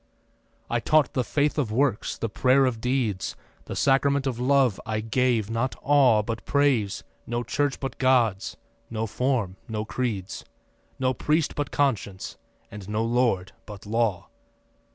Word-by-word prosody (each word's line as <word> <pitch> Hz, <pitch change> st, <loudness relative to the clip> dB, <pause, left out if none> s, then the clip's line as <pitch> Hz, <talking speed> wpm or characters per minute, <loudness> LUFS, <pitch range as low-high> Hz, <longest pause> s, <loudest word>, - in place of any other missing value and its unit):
I 120 Hz, -, 0 dB
taught 155 Hz, +4 st, +3 dB
the 130 Hz, -, +1 dB
faith 145 Hz, +5 st, 0 dB
of 125 Hz, -7 st, -1 dB
works, 125 Hz, -1 st, 0 dB
the 115 Hz, -, -2 dB
prayer 130 Hz, +5 st, +3 dB
of 115 Hz, -4 st, -1 dB
deeds, 125 Hz, -6 st, -1 dB, 0.3 s
The -, -, -6 dB
sacrament 140 Hz, 0 st, +2 dB
of 125 Hz, -3 st, -2 dB
love. 130 Hz, -4 st, +2 dB
I 110 Hz, -1 st, -2 dB
gave, 115 Hz, -1 st, 0 dB
not 115 Hz, +3 st, -1 dB
awe, 130 Hz, -6 st, +5 dB
But 110 Hz, 0 st, -4 dB
praise; 115 Hz, -7 st, +1 dB, 0.2 s
no 120 Hz, +1 st, -2 dB
church 140 Hz, +4 st, -1 dB
but 135 Hz, -1 st, -5 dB
God's; 120 Hz, -6 st, +2 dB, 0.3 s
no 110 Hz, -1 st, -2 dB
form, 115 Hz, -5 st, -1 dB
no 110 Hz, -2 st, -3 dB
creeds; 110 Hz, -6 st, -3 dB, 0.5 s
No 130 Hz, 0 st, +1 dB
priest 150 Hz, +5 st, 0 dB
but 145 Hz, -, -3 dB
conscience 105 Hz, -9 st, -1 dB, 0.3 s
and 105 Hz, -2 st, -9 dB
no 110 Hz, +1 st, 0 dB
lord 115 Hz, -6 st, +1 dB, 0.2 s
but 105 Hz, -2 st, -10 dB
law. 110 Hz, -3 st, 0 dB
120 Hz, 150 wpm, -25 LUFS, 110-135 Hz, 0.5 s, awe